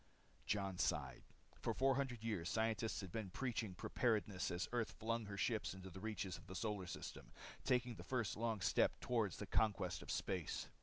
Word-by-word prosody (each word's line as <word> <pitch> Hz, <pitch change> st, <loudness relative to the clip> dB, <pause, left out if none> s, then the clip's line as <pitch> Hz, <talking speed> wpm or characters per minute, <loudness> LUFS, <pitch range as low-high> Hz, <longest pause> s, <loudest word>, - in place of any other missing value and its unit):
Jon 100 Hz, -3 st, 0 dB
sighed. -, -, +1 dB, 0.4 s
For -, -, 0 dB
400 135 Hz, -3 st, +2 dB
years 100 Hz, -6 st, 0 dB
scientists 110 Hz, 0 st, +1 dB
had 95 Hz, -3 st, -6 dB
been 110 Hz, -2 st, -2 dB
preaching 110 Hz, -2 st, -1 dB
preparedness 105 Hz, -4 st, +1 dB
as 90 Hz, +1 st, -1 dB
Earth 120 Hz, -2 st, 0 dB
flung 115 Hz, 0 st, -1 dB
her 100 Hz, -1 st, -5 dB
ships 110 Hz, -2 st, +1 dB
into 95 Hz, 0 st, -8 dB
the 95 Hz, -, -7 dB
reaches 100 Hz, -3 st, -2 dB
of -, -, -16 dB
the 95 Hz, -, -6 dB
solar 100 Hz, -1 st, -1 dB
system, 85 Hz, -, -6 dB, 0.3 s
taking 125 Hz, -2 st, +3 dB
the -, -, -8 dB
first 120 Hz, -6 st, 0 dB
long 110 Hz, -2 st, 0 dB
step -, -, +4 dB
toward 110 Hz, -7 st, +1 dB
the 105 Hz, -, -4 dB
conquest 105 Hz, +1 st, +2 dB
of -, -, -10 dB
space. 90 Hz, -5 st, -1 dB
110 Hz, 175 wpm, -42 LUFS, 95-115 Hz, 0.4 s, step